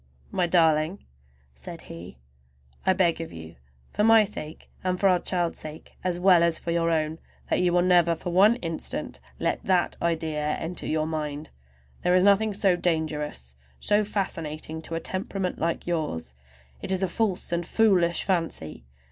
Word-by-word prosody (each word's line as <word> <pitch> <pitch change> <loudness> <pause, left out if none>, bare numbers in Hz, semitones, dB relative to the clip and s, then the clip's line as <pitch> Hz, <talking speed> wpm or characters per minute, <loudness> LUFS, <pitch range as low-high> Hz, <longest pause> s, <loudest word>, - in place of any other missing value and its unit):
"My 180 -1 +1
darling," 165 +1 +2 0.5
said 65 0 -9
he, 85 -5 -10 0.7
"I 190 - +6
beg 175 -3 +1
of 165 - -7
you, 80 0 -10 0.4
for 210 - +1
my 225 0 +7
sake 160 -7 -8
and 185 -1 -1
for 200 - +4
our 180 -2 +4
child's 175 -2 -1
sake, 155 0 -10
as 180 -1 -1
well 180 -2 +6
as 170 -1 +3
for 170 - -4
your 170 0 +1
own, 160 0 0 0.3
that - - +3
you 180 -1 +3
will 175 0 +3
never 175 -2 +4
for 175 +2 -5
one 200 +6 +6
instant 165 -9 -5 0.2
let - - -1
that 185 -2 +1
idea 155 -3 -1
enter 170 +2 -4
your 155 0 0
mind! 150 -1 -4 0.5
There 180 0 +3
is 185 - +4
nothing 205 +1 +4
so 195 -3 +3
dangerous, 155 - -2 0.3
so 210 +1 +2
fascinating, 160 -6 -4
to 165 - -5
a - - -1
temperament 185 0 -3
like 165 +1 -1
yours. 150 - -3 0.5
It - - -4
is 190 0 0
a - - +2
false 190 -1 -1
and 170 0 0
foolish 180 -3 +3
fancy. 165 - -2
170 Hz, 170 wpm, -26 LUFS, 155-185 Hz, 0.7 s, my